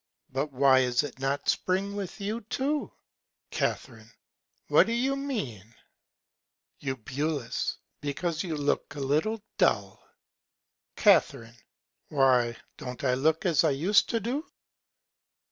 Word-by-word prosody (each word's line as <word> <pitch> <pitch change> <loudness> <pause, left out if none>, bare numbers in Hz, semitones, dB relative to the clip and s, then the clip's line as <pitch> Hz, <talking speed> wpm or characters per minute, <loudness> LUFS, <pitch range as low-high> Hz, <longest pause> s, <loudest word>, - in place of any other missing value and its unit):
But 140 +3 -2
why 135 0 +5
is 125 -1 +2
it 140 -3 -7
not 135 +1 -1
Spring 195 +2 0
with 200 0 -5
you 210 +4 -3
too? 290 +3 -1 0.6
Ca. - - +1 0.9
What - - +5
do 230 - -1
you 260 +4 +1
mean? 135 - -5 1.0
Eu. 135 -2 -2 1.1
Because 155 +4 -2
you 165 -4 -3
look 145 0 -1
a - - -6
little 155 +11 0 0.2
dull. 100 -1 +1 0.9
Ca. - - +7 0.9
Why, 125 -5 +3 0.2
don't 125 +1 -7
I 130 -2 +2
look 160 +8 +1
as 170 -5 +4
I 160 - +4
use 165 +9 +4
to 230 - -2
do? 255 +7 -2
150 Hz, 120 wpm, -28 LUFS, 135-205 Hz, 1.1 s, Ca